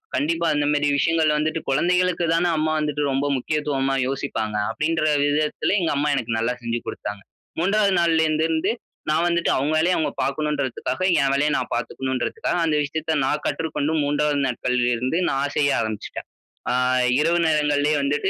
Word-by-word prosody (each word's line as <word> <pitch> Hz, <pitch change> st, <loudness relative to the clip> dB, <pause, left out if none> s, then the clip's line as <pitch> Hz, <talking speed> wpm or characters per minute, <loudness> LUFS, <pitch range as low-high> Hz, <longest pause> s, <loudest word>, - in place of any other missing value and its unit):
கண்டிப்பா. 165 Hz, +5 st, 0 dB
இந்த 145 Hz, -, +1 dB
மாதிரி 145 Hz, 0 st, +1 dB
விஷயங்கள் 160 Hz, 0 st, +2 dB
வந்துட்டு 155 Hz, +2 st, -1 dB
குழந்தைகளுக்கு 180 Hz, +4 st, +1 dB
தான 170 Hz, -, +1 dB
அம்மா 155 Hz, 0 st, 0 dB
வந்துட்டு 150 Hz, -1 st, -1 dB
ரொம்ப 135 Hz, +2 st, 0 dB
முக்கியத்துவமா 135 Hz, -1 st, -1 dB
யோசிப்பாங்க. 125 Hz, -6 st, -3 dB, 0.2 s
அப்படின்ற 155 Hz, +7 st, -1 dB, 0.2 s
விதத்தில, 150 Hz, +6 st, 0 dB
எங்க 165 Hz, -, 0 dB
அம்மா 150 Hz, +1 st, +1 dB
எனக்கு 115 Hz, -3 st, -2 dB
நல்லா 115 Hz, +2 st, 0 dB
செஞ்சு 115 Hz, 0 st, -2 dB
கொடுத்தாங்க. 105 Hz, -1 st, -5 dB, 0.4 s
3 200 Hz, +2 st, +2 dB
நாள்ல 165 Hz, -1 st, +3 dB
இருந்து 155 Hz, +1 st, +1 dB
இருந்து 160 Hz, +4 st, +1 dB, 0.4 s
நான் 160 Hz, +3 st, +2 dB
வந்துட்டு. 170 Hz, -1 st, +1 dB
அவங்க 140 Hz, +3 st, 0 dB
வேலைய 175 Hz, +3 st, +2 dB
அவங்க 160 Hz, -, 0 dB
பார்க்கணும்ன்றதுக்காக 140 Hz, -1 st, -2 dB, 0.2 s
என் 135 Hz, 0 st, +2 dB
வேலையை 145 Hz, +2 st, +2 dB
நான் -, -, -4 dB
பார்த்துக்கணும்ன்றதுக்காக, 130 Hz, -, -2 dB
அந்த 155 Hz, -2 st, +1 dB
விஷயத்தை 155 Hz, +2 st, -2 dB
நான் 150 Hz, +2 st, -1 dB
கற்றுக்கொண்டு 155 Hz, -1 st, -2 dB
3 145 Hz, 0 st, +1 dB
நாட்கள்ல 125 Hz, -1 st, 0 dB
இருந்து 125 Hz, +7 st, -1 dB
நான் 140 Hz, +1 st, -1 dB
செய்ய 140 Hz, -1 st, +3 dB
ஆரம்பிச்சுட்டேன். 110 Hz, -1 st, -5 dB, 0.4 s
அ -, -, +1 dB, 0.5 s
இரவு 170 Hz, +3 st, +2 dB
நேரங்களிலே 150 Hz, -1 st, +2 dB
வந்துட்டு. 145 Hz, +1 st, 0 dB
150 Hz, 155 wpm, -22 LUFS, 135-160 Hz, 0.5 s, நாள்ல